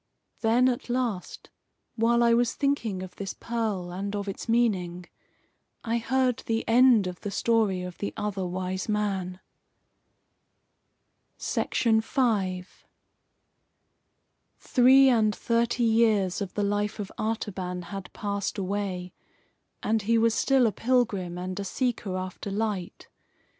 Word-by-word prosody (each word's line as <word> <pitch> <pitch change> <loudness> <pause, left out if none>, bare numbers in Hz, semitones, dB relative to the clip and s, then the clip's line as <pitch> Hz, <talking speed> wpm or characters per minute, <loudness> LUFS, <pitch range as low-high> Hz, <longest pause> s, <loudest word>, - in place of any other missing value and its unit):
Then, 235 +3 +3
at 245 -1 -2
last, 240 -7 -3 0.4
while 235 +1 +3
I 235 0 +5
was 235 0 +2
thinking 235 -10 -1
of 185 - -10
this 195 -1 -5
pearl, 215 -7 -3
and 200 +3 -4
of 205 0 -3
its 195 +4 -6
meaning, 185 -7 +1 0.8
I 230 +1 0
heard 255 +1 +1
the 225 0 -1
end 240 -3 +5
of 180 -1 -5
the 205 - -4
story 210 -4 +1
of 180 -1 -8
the 200 - -3
Other 205 -2 -2
Wise 185 +2 -3
Man. 195 -3 -1 2.0
V 220 -2 +1 2.6
Three 265 +1 +5
and 220 -4 +3
thirty 235 +1 0
years 220 -5 +2
of 195 -2 -4
the 205 - 0
life 205 +1 -1
of 205 -2 -5
Artaban 190 -5 -3
had 195 0 -8
passed 200 -1 -3
away, 190 -2 -3 0.7
and 220 +1 +1
he 230 +3 +2
was 225 0 +3
still 265 +1 +3
a 225 - +2
pilgrim 205 -7 0
and 185 +2 -4
a - - -2
seeker 210 -3 -2
after 185 +2 -5
light. 200 -3 -3
210 Hz, 125 wpm, -27 LUFS, 190-230 Hz, 2.6 s, I